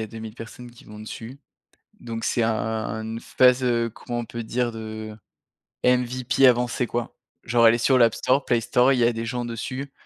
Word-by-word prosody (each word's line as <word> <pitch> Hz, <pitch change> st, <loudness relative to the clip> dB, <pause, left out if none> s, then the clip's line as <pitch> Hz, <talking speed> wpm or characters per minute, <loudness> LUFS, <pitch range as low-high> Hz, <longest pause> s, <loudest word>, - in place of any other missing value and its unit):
a 110 Hz, -, -5 dB
2000 110 Hz, 0 st, -8 dB
personnes 120 Hz, +1 st, -10 dB
qui 120 Hz, -, -17 dB
vont 105 Hz, 0 st, -12 dB
dessus. 115 Hz, +4 st, -8 dB, 0.6 s
Donc 115 Hz, -1 st, -6 dB
c'est 120 Hz, -, +1 dB
un 115 Hz, -, +2 dB
un 110 Hz, 0 st, -3 dB
une 110 Hz, +1 st, -5 dB
phase, 125 Hz, +2 st, +3 dB
heu, 115 Hz, -1 st, +1 dB
comment 120 Hz, +2 st, -6 dB
on 120 Hz, -, -4 dB
peut 115 Hz, +1 st, -6 dB
dire, 120 Hz, +2 st, -1 dB
de 110 Hz, -1 st, -7 dB, 0.7 s
MVP 125 Hz, +1 st, +3 dB
avancée 125 Hz, 0 st, +2 dB
quoi. 120 Hz, 0 st, -4 dB, 0.3 s
Genre 115 Hz, 0 st, +4 dB
elle 115 Hz, -, +6 dB
est -, -, 0 dB
sur 130 Hz, +3 st, +3 dB
l'App 115 Hz, -3 st, +4 dB
Store, 130 Hz, +2 st, +1 dB
Play 120 Hz, -1 st, +2 dB
Store, 125 Hz, +3 st, +3 dB
il 125 Hz, -, 0 dB
y -, -, +3 dB
a 120 Hz, -, +4 dB
des 115 Hz, 0 st, -4 dB
gens 125 Hz, +1 st, -3 dB
dessus. 130 Hz, +4 st, -5 dB
120 Hz, 210 wpm, -24 LUFS, 115-125 Hz, 0.7 s, elle